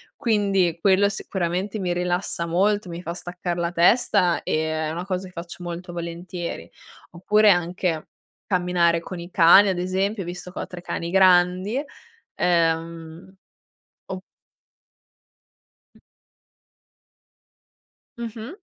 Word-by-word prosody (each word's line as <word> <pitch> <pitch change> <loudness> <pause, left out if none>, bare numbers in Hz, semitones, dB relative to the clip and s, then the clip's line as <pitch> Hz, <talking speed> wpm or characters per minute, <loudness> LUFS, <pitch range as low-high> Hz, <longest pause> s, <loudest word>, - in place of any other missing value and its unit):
Quindi 200 - +1
quello 195 +2 +4
sicuramente 190 +1 -3
mi 180 -2 -1
rilassa 175 -1 -1
molto, 195 +4 +1
mi 170 0 -6
fa 170 -1 -5
staccar 175 0 -5
la 170 0 -2
testa 180 -1 +3
e 160 0 -1
è 155 0 -2
una 170 +2 -4
cosa 185 -1 -3
che 180 - -16
faccio 170 +1 -8
molto 175 +1 -6
volentieri, 170 +1 -6 0.4
oppure 210 +4 +3
anche 175 -2 0 0.4
camminare 175 -3 +2
con 180 +1 -7
i 175 +1 -9
cani 185 +4 +7
ad 185 -2 -1
esempio 190 +3 -1
visto 180 +1 -7
che - - -7
ho - - -3
3 180 - -9
cani 170 -1 -4
grandi, 185 +5 +3 0.5
ehm, 165 +1 -1 0.7
o 185 0 -6 1.7
Mh. - - -21 2.2
Mh-mh. 235 - -7
180 Hz, 120 wpm, -23 LUFS, 170-195 Hz, 2.2 s, cani